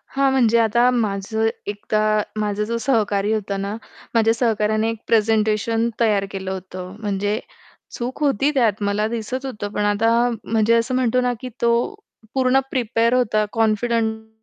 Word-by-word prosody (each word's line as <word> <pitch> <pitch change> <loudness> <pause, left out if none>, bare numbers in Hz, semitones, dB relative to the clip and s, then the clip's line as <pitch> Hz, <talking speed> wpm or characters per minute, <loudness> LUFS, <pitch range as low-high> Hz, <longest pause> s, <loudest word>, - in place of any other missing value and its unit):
हां, 275 0 +3
म्हणजे 235 -4 +3
आता 235 +2 +3
माझं 220 -1 0 0.2
एकदा 205 +1 -2 0.4
माझा 210 0 -1
जो 230 +2 -2
सहकारी 210 -5 +1
होता 200 -2 -2
ना, 200 +1 -3 0.4
माझ्या 225 0 +4
सहकाऱ्याने 220 -2 +1
एक 230 - -3
प्रेझेंटेशन 220 +1 +2
तयार 210 -4 +2
केलं 190 -1 -4
होतं. 185 0 -7
म्हणजे 205 0 -1 0.6
चूक 250 +3 -5
होती 280 0 +2
त्यात 220 -6 +2
मला 205 +1 0
दिसत 235 +4 -4
होतं, 210 -6 -5
पण 210 - 0
आता 225 +4 +2
म्हणजे 225 0 +2
असं 230 +3 +1
म्हणतो 255 -1 +2
ना, 250 0 +1
की 255 - -5
तो 235 - +3 0.6
पूर्ण 260 0 +3
प्रिपेअर 235 -1 +1
होता 215 -4 +2
कॉन्फिडंट 220 0 0
220 Hz, 150 wpm, -21 LUFS, 210-235 Hz, 0.6 s, माझ्या